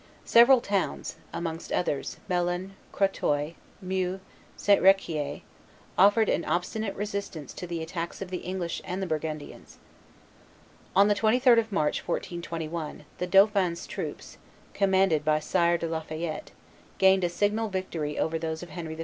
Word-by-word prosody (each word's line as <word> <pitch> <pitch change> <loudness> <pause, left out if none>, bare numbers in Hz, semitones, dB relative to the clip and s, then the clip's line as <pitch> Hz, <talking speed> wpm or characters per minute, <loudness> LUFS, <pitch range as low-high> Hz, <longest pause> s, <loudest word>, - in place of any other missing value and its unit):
Several 240 +2 +7
towns, 200 -4 -2
amongst 165 -1 -5
others, 145 -6 -1
Melun, 175 +1 -1 0.2
Crotoy, 155 -6 0 0.3
Meaux, 185 0 -1
and 190 - -8 0.4
St. 205 -1 +4
Riquier, 175 -6 +2 0.5
offered 205 +3 +5
an 170 - +1
obstinate 200 +4 -2
resistance 200 -7 -5
to 180 - -7
the 170 -1 -3
attacks 170 +1 -5
of 190 -2 -6
the 180 - -2
English 180 -2 -4
and 190 +1 -3
Burgundians. 155 -2 -5 1.2
On 200 +1 +6
the 210 - +4
23d 235 +3 +4
of 225 -1 -3
March, 155 -7 +1
1421, 165 -3 -4
the 180 - -1
dauphin's 195 -2 +3
troops, - - -6 0.3
commanded 190 -5 +3
by 155 0 +3
Sire 170 +2 +2
de 170 - -4
la 160 0 -2
Fayette, 155 0 -5 0.5
gained 190 -1 +5
a 175 - +2
signal 210 +5 0
victory 170 -6 -3
over 160 0 0
those 160 0 -4
of 175 - -10
Henry 160 0 -6
V. - - -13
180 Hz, 145 wpm, -27 LUFS, 160-195 Hz, 1.2 s, Several